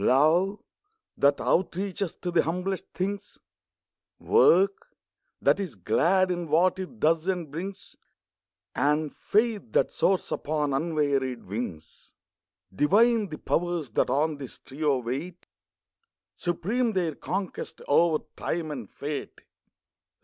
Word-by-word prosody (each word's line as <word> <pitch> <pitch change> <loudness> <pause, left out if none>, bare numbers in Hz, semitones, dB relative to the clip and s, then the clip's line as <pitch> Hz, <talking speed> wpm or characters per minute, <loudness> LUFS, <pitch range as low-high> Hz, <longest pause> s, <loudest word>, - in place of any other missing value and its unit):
Love, 165 - +4 0.6
that 140 0 +3
outreaches 190 0 -1
to 175 - -3
the 170 - +4
humblest 180 +4 -2
things; 200 +2 -4 0.8
Work 195 - +3 0.4
that - - +3
is 185 -10 -4
glad, 170 - +2
in 175 -1 -3
what 175 +5 +3
it 190 +5 -7
does 160 +2 +2
and 175 -6 -2
brings; 190 +5 -7 0.8
And 150 +2 +1
faith 215 0 +1
that - - +3
soars 190 -1 +1
upon 150 -2 -1
unwearied 140 -4 0
wings. 90 -6 -7 0.6
Divine 210 - +3
the 155 - -6
Powers 170 -6 -1
that - - +1
on 150 +3 +1
this 135 -3 -8
trio 145 0 -1
wait. 135 +9 -5 0.9
Supreme 215 +8 -1
their 175 -5 0
conquest, 185 +6 -5
over 155 +1 +3
Time 165 -2 -3
and 125 -8 -6
Fate. 145 0 -6
165 Hz, 115 wpm, -27 LUFS, 145-190 Hz, 0.9 s, Love